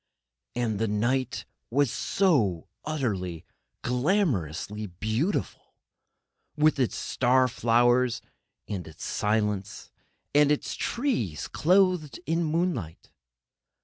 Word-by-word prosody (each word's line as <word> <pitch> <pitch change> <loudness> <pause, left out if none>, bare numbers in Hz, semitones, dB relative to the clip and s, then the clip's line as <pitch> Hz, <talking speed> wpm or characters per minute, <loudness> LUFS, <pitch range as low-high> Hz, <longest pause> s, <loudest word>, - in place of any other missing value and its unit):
And 115 -4 -1
the 115 - +1
night 120 +5 0 0.2
was 135 0 +2
so 195 -1 +1
beautiful, 95 - +1
so 155 - -7
utterly, 95 - -2 0.4
glamourously 120 - 0
beautiful, 115 - -2 0.8
with 150 -1 +3
its 125 - +1
star 130 +1 +2
flowers, 120 +1 +3 0.5
and 95 -6 -4
its 80 - -9
silence, 105 -2 -1 0.4
and 145 0 +5
its 150 - 0
trees 125 - -1
clothed 180 - +2
in 165 +3 +1
moonlight. 155 - -2
120 Hz, 100 wpm, -27 LUFS, 105-150 Hz, 0.8 s, and